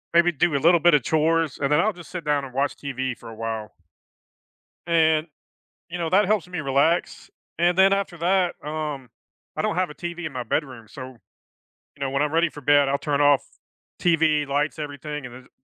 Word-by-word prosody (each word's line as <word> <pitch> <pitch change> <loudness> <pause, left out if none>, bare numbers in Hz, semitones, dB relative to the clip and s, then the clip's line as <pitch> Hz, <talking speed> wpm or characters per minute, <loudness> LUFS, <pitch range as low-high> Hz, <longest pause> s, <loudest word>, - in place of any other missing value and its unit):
maybe 175 +1 +5
do 160 0 +1
a - - +3
little 170 +4 +4
bit 170 -1 +5
of 135 - +2
chores, 160 0 +1
and 140 +1 0
then 150 - +4
I'll 215 +3 +2
just 175 -1 -13
sit 180 -3 -6
down 145 -2 +1
and 130 -2 -9
watch 140 +2 0
TV 130 -3 -4
for - - -12
a 110 - -10
while. 110 -1 -5 1.2
And, 160 -1 +3 0.6
you 175 - -5
know, 165 -1 -2
that 195 +2 +4
helps 205 -4 0
me 180 -3 -4
relax, 140 +5 0 0.3
and 175 +1 +2
then 195 +1 +6
after 195 -3 -1
that, 180 +1 +1
um, 150 -5 -4 0.5
I - - -1
don't 165 - -1
have 185 -3 0
a - - -9
TV 175 0 -6
in 150 - -6
my 125 -1 -4
bedroom, 125 -2 -3
so, 135 - -9 0.9
you 140 - -19
know, 135 - -1
when 135 +1 -1
I'm 150 0 0
ready 165 +1 +3
for 145 - -11
bed, 145 0 +4
I'll 140 - +1
turn 145 0 -1
off 145 -1 +5 0.6
TV, 160 -3 +2
lights, 145 +3 -1
everything, 150 -1 -6
and 120 - -9
then 130 +1 -12
ju - - -24
150 Hz, 215 wpm, -24 LUFS, 140-170 Hz, 1.2 s, then